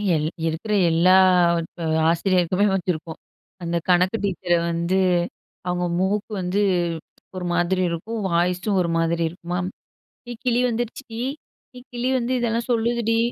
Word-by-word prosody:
L 155 Hz, 0 st, 0 dB, 0.2 s
இருக்கிற 165 Hz, +7 st, -2 dB, 0.2 s
எல்லா 170 Hz, +3 st, +5 dB, 0.9 s
ஆசிரியருக்குமே 180 Hz, +2 st, +2 dB
வச்சிருப்போம். 170 Hz, -3 st, -3 dB, 0.4 s
அந்த 170 Hz, 0 st, -1 dB
கணக்கு 180 Hz, +4 st, +3 dB
டீச்சர 185 Hz, -2 st, -1 dB, 0.2 s
வந்து, 170 Hz, +3 st, 0 dB, 0.7 s
அவங்க 180 Hz, 0 st, 0 dB
மூக்கு 200 Hz, +3 st, -1 dB
வந்து 185 Hz, +3 st, 0 dB, 0.7 s
ஒரு 185 Hz, -1 st, -4 dB
மாதிரி 175 Hz, +2 st, +1 dB
இருக்கும். 215 Hz, +7 st, -4 dB
வாய்ஸ்சும் 180 Hz, +3 st, +1 dB
ஒரு 170 Hz, -, -1 dB
மாதிரி 165 Hz, 0 st, +1 dB
இருக்குமாம். 175 Hz, +1 st, -4 dB, 0.6 s
"ஏ -, -, -4 dB
கிளி 245 Hz, -1 st, +2 dB
வந்துடுச்சுடி! 235 Hz, 0 st, -4 dB, 0.6 s
ஏ -, -, -8 dB
கிளி 245 Hz, +1 st, -2 dB
வந்து 245 Hz, 0 st, -2 dB
இதெல்லாம் 235 Hz, 0 st, -1 dB
சொல்லுதுடி" 230 Hz, -1 st, +1 dB
185 Hz, 120 wpm, -23 LUFS, 170-225 Hz, 0.9 s, எல்லா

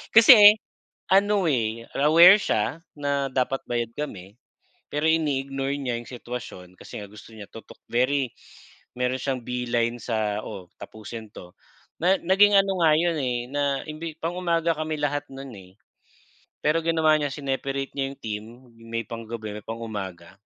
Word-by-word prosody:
Kasi 215 Hz, -2 st, +10 dB, 0.6 s
ano, 200 Hz, +1 st, +4 dB
eh, 115 Hz, -4 st, -1 dB, 0.2 s
aware 170 Hz, +7 st, +8 dB
siya 165 Hz, -, -1 dB, 0.2 s
na 140 Hz, -1 st, -1 dB
dapat 130 Hz, +1 st, 0 dB
bayad 120 Hz, -1 st, -2 dB
kami, 100 Hz, -10 st, -7 dB, 0.6 s
pero 150 Hz, +2 st, 0 dB
ini-ignore 135 Hz, -3 st, -1 dB
niya 125 Hz, -3 st, -2 dB
yung 120 Hz, -, -10 dB
sitwasyon 120 Hz, -7 st, -8 dB
kasi -, -, -9 dB
nga 100 Hz, -, -9 dB
gusto 105 Hz, +2 st, -14 dB
niya 105 Hz, -2 st, -9 dB
tutok. 115 Hz, -, -13 dB
Very 130 Hz, +2 st, +1 dB, 0.7 s
meron 125 Hz, +1 st, -1 dB
siyang 130 Hz, -1 st, -2 dB
beeline 120 Hz, -1 st, -1 dB
sa 110 Hz, -3 st, -1 dB
oo, 90 Hz, -2 st, -8 dB
tapusin 110 Hz, 0 st, -9 dB
’to, 90 Hz, 0 st, -12 dB, 0.5 s
na 180 Hz, +3 st, +4 dB
naging 195 Hz, +4 st, +5 dB
ano 195 Hz, -1 st, +1 dB
nga 160 Hz, -2 st, +5 dB
yun, 170 Hz, 0 st, +1 dB
eh, 125 Hz, -3 st, -2 dB
na 140 Hz, -1 st, -1 dB
imbi 155 Hz, +1 st, -6 dB
pang-umaga 170 Hz, -1 st, 0 dB
kami 155 Hz, 0 st, -3 dB
lahat 145 Hz, 0 st, -1 dB
no’n, 135 Hz, 0 st, -8 dB
eh. 95 Hz, -1 st, -14 dB, 0.9 s
Pero 155 Hz, +2 st, +2 dB
ginawa 160 Hz, -2 st, +3 dB
niya, 145 Hz, -2 st, -2 dB
sineparate 135 Hz, -1 st, -3 dB
niya 135 Hz, -1 st, -2 dB
yung 140 Hz, -, -17 dB
team, 105 Hz, -1 st, -5 dB, 0.3 s
may 115 Hz, 0 st, -5 dB
pang 115 Hz, +2 st, -8 dB
gabi, 110 Hz, -2 st, -6 dB
may 105 Hz, -, -10 dB
pang-umaga. 95 Hz, -6 st, -7 dB
135 Hz, 150 wpm, -25 LUFS, 115-155 Hz, 0.9 s, Kasi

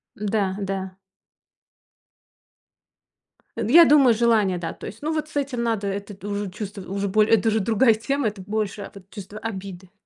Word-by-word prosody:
Да, 200 Hz, -2 st, -1 dB
да. 190 Hz, -1 st, -4 dB, 2.6 s
Я 325 Hz, +10 st, +7 dB
думаю, 275 Hz, -5 st, +6 dB
желание, 215 Hz, -5 st, +2 dB
да, 170 Hz, -1 st, -4 dB
то -, -, -9 dB
есть. 210 Hz, -, -10 dB
Ну, 310 Hz, +2 st, -2 dB
вот 310 Hz, -1 st, -2 dB
с 310 Hz, -, -17 dB
этим 275 Hz, -4 st, -1 dB
надо 220 Hz, -4 st, -1 dB
это 200 Hz, 0 st, -6 dB
уже 205 Hz, -1 st, -3 dB
чувств 205 Hz, +1 st, -7 dB
уже 195 Hz, +1 st, -3 dB
боле 215 Hz, +2 st, +3 dB
это 225 Hz, +1 st, +4 dB
уже 220 Hz, 0 st, +1 dB
другая 225 Hz, +3 st, +3 dB
тема, 275 Hz, +4 st, -1 dB
это 205 Hz, -2 st, -5 dB
больше 205 Hz, +1 st, -3 dB, 0.2 s
чувство 205 Hz, 0 st, -9 dB
обиды. 190 Hz, -4 st, -7 dB
210 Hz, 155 wpm, -23 LUFS, 195-230 Hz, 2.6 s, Я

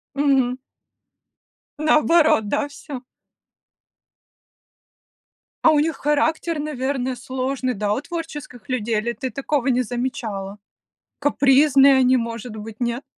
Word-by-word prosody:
Мгм. 270 Hz, -3 st, +2 dB, 1.2 s
Наоборот, 305 Hz, -5 st, +3 dB
да, 285 Hz, -, 0 dB
всё. 280 Hz, -2 st, -8 dB, 2.6 s
А -, -, +7 dB
у 300 Hz, -, +3 dB
них 315 Hz, +1 st, 0 dB
характер, 315 Hz, +2 st, 0 dB
наверное, 265 Hz, -3 st, -2 dB
сложный, 255 Hz, +1 st, -3 dB
да, 205 Hz, 0 st, 0 dB
у 255 Hz, -, -2 dB
творческих 295 Hz, -7 st, -7 dB
людей, 235 Hz, -4 st, -1 dB
или 235 Hz, +3 st, -1 dB
ты 255 Hz, +4 st, -4 dB
такого 275 Hz, 0 st, -2 dB
не 255 Hz, -1 st, +2 dB
замечала? 225 Hz, -5 st, -4 dB, 0.6 s
Капризные 280 Hz, 0 st, +5 dB
они, 260 Hz, 0 st, +4 dB
может 230 Hz, -1 st, -5 dB
быть, 220 Hz, 0 st, -9 dB
нет? 240 Hz, +1 st, -2 dB
260 Hz, 110 wpm, -22 LUFS, 240-290 Hz, 2.6 s, А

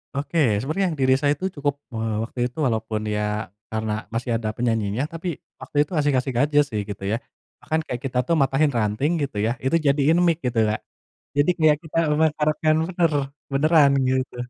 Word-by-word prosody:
Oke, 145 Hz, +4 st, -1 dB, 0.2 s
sebenarnya 160 Hz, -, 0 dB
yang 155 Hz, -4 st, -5 dB
diri 130 Hz, 0 st, +4 dB
saya 145 Hz, 0 st, +2 dB
itu 185 Hz, -, -5 dB
cukup. 145 Hz, -1 st, 0 dB, 0.2 s
Eee, 110 Hz, 0 st, -2 dB
waktu 120 Hz, +2 st, -8 dB
itu 125 Hz, -, -17 dB
walaupun 110 Hz, -1 st, -2 dB
ya 105 Hz, -1 st, -2 dB, 0.2 s
karena 110 Hz, 0 st, -2 dB, 0.2 s
masih 120 Hz, +1 st, -2 dB
ada 110 Hz, -2 st, -2 dB
penyanyinya, 115 Hz, 0 st, 0 dB
tapi 165 Hz, +2 st, -6 dB, 0.3 s
waktu -, -, -12 dB
itu 150 Hz, -, -16 dB
ngasih 145 Hz, -2 st, +2 dB
kasih 130 Hz, +1 st, 0 dB
gaji 145 Hz, +3 st, +1 dB
sih 105 Hz, -5 st, -2 dB
gitu 100 Hz, -1 st, -6 dB
ya. 115 Hz, -, +1 dB, 0.4 s
Bahkan 160 Hz, 0 st, -1 dB
kayak 125 Hz, +1 st, -5 dB
kita 125 Hz, -1 st, -3 dB
tuh 170 Hz, -, +3 dB
matahin 135 Hz, +2 st, +2 dB
ranting 110 Hz, +7 st, 0 dB
gitu 130 Hz, -7 st, -4 dB
ya, 115 Hz, -, +1 dB
itu 135 Hz, +5 st, +1 dB
jadiin 145 Hz, +4 st, +3 dB
mic 165 Hz, -2 st, +2 dB
gitu, 120 Hz, -2 st, 0 dB
Kak. 110 Hz, -, -1 dB, 0.6 s
Jadi 145 Hz, +5 st, +3 dB
kayak 155 Hz, -1 st, +5 dB
kita 160 Hz, 0 st, -5 dB
memasarkan 155 Hz, 0 st, +2 dB, 0.2 s
bener, 175 Hz, -3 st, +1 dB, 0.4 s
beneran 150 Hz, +1 st, +5 dB, 0.2 s
gitu. 130 Hz, -1 st, -1 dB
135 Hz, 185 wpm, -23 LUFS, 115-155 Hz, 0.6 s, kayak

